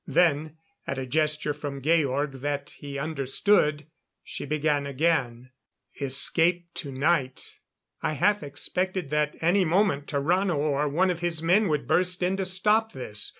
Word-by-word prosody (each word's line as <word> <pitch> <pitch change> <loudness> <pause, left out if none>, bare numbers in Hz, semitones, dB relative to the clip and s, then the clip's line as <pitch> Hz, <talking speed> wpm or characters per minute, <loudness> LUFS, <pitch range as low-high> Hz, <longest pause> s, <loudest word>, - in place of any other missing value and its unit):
Then, 155 -2 +1 0.3
at 135 - -3
a 130 - -3
gesture 150 +2 0
from 145 -1 -6
Georg 145 -3 +1
that 145 0 -3
he 140 -1 -8
understood, 150 +2 +1 0.4
she - - -6
began 150 -1 0
again: 130 -4 -1 0.5
"Escape 165 +6 +3
tonight 140 -1 -1 0.2
" - - -51
I - - -1
half 205 +8 +2
expected 180 +3 -3
that 150 0 0
any 180 +4 +3
moment 175 -4 +1
Tarrano 170 +5 0
or 145 0 0
one 180 +6 +2
of 175 - -4
his 170 -2 -2
men 195 +6 +3
would 150 -3 -1
burst 180 0 +1
in 185 +2 +1
to 190 - -2
stop 210 +4 +1
this. 105 -5 -3
150 Hz, 150 wpm, -26 LUFS, 140-180 Hz, 0.5 s, Escape